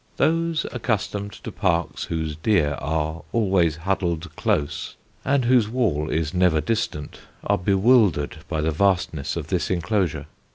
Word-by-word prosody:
Those 165 0 +1
accustomed 105 -5 -2
to - - -8
parks 85 -4 -1
whose 80 -2 -3
deer 80 -3 +2
are 80 +2 -2
always 95 -8 +2
huddled 85 -2 -2
close 70 - -1 0.3
and 135 -2 +2
whose 120 -3 +4
wall 100 - 0
is 80 +1 -1
never 90 -3 +3
distant, 105 -7 -3 0.2
are - - +1
bewildered 95 - +3
by 80 -2 -1
the 80 +1 +1
vastness 85 -4 0
of - - -5
this - - 0
enclosure. 85 -5 0
90 Hz, 135 wpm, -23 LUFS, 80-110 Hz, 0.3 s, whose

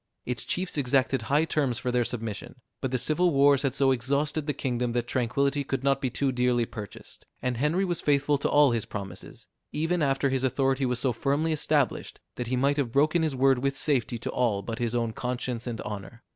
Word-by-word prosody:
Its 125 -1 -2
chiefs 180 -4 -1
exacted 135 -1 +2
high 150 +3 +3
terms 140 -7 0
for 125 0 -2
their 120 0 +2
submission; 115 -2 -5 0.3
but 130 - -1
the 130 - 0
civil 155 +8 +2
wars 140 -1 +5
had 135 -2 -1
so 135 -1 +3
exhausted 140 +4 0
the - - +2
kingdom, 125 -3 -2
that 120 -1 0
tranquillity 140 +4 0
could 135 -1 -3
not 135 0 +2
be 130 - 0
too 135 +2 0
dearly 125 -1 +1
purchased; 105 -3 -10
and 125 -1 -2
Henry 155 +9 +1
was 175 -2 -2
faithful 145 0 +2
to - - 0
all 145 -2 +5
his 115 -2 0
promises, 95 -3 -8 0.2
even 165 +3 0
after 140 -1 +2
his 130 -1 0
authority 135 0 +1
was 125 -1 0
so 125 0 +1
firmly 145 +6 0
established, 145 -4 0
that 125 - -5
he 130 - 0
might 140 +3 +2
have 135 -5 0
broken 155 +6 +3
his 155 -4 0
word 135 0 +3
with 135 +1 -1
safety 125 -5 0
to 115 - -4
all 110 -6 0
but 115 +4 -5
his 120 0 -1
own 115 -2 0
conscience 125 0 -3
and 115 -2 -4
honor. 105 +3 -7
130 Hz, 215 wpm, -27 LUFS, 120-145 Hz, 0.3 s, wars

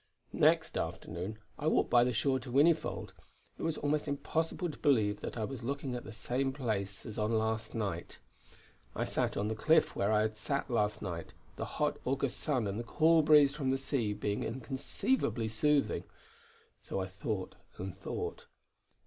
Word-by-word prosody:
Next - - +3
afternoon 90 +6 -4 0.2
I 150 - -1
walked - - +2
by 120 -1 +7
the 125 - +2
shore 130 +3 +2
to 125 - -9
Whinnyfold. 155 +5 +3 0.5
It - - -6
was 165 -2 -1
almost 150 +1 0
impossible 160 +5 -1
to - - -13
believe 110 -8 +3
that - - -5
I 110 - -1
was 135 +1 -6
looking 135 +1 -3
at 125 - -5
the - - -7
same 130 +4 -1
place 100 -7 -3
as 110 - -5
on 105 +2 +1
last 110 0 -1
night. 100 -6 -3 0.8
I - - 0
sat - - -1
on 100 - 0
the 110 - 0
cliff 155 +9 +3
where 100 +2 +1
I 105 0 +4
had 110 0 -1
sat 140 +4 -2
last 105 -3 +1
night, 85 -4 -5 0.2
the - - -3
hot - - +1
August 135 0 -1
sun 130 -7 0
and 100 +2 -2
the - - -3
cool 160 +7 +4
breeze 150 -2 +6
from 145 -3 -1
the 135 - +2
sea 135 -5 -1
being 105 0 -2
inconceivably 130 - -1
soothing. 140 +7 +1 0.8
So - - -3
I 95 - -1
thought 95 +1 -4 0.2
and 95 -1 -5
thought.... 95 - -5
120 Hz, 180 wpm, -33 LUFS, 105-140 Hz, 0.8 s, by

